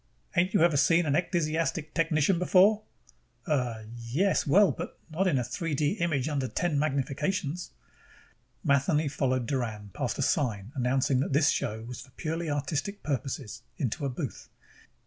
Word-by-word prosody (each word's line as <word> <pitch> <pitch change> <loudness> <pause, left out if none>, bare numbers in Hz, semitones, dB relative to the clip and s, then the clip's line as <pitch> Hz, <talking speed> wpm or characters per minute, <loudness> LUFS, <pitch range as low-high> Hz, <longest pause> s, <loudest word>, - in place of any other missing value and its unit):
"Ain't 185 +4 +2
you 195 - +5
ever 170 -4 +4
seen 165 +4 +4
a 145 - 0
ecdysiastic 165 -1 0
technician 165 +1 +2
before?" 195 +4 +5 0.6
"Uh, 125 - -1
yes, 130 +12 0
but 140 - -2 0.3
well, - - -3 0.2
not 185 +5 +1
in 160 -7 +2
a 125 - +1
3 150 +6 -3
D 145 +1 +1
image 155 -6 0
under 140 -4 -1
ten 160 +1 0
magnifications." 150 +4 -1 0.9
Matheny 145 +3 +2
followed 130 -3 0
Doran 110 -6 -3
past - - -2
a - - 0
sign 110 -5 0
announcing 130 0 +1
that 135 - -1
this 145 +1 +4
show 110 +1 -2
was 120 0 -7
for - - -13
purely 165 +1 -2
artistic 145 +7 -2
purposes, 125 -5 -3 0.2
into 130 +1 -2
a 140 - 0
booth. 135 0 -6
145 Hz, 155 wpm, -28 LUFS, 130-165 Hz, 0.9 s, you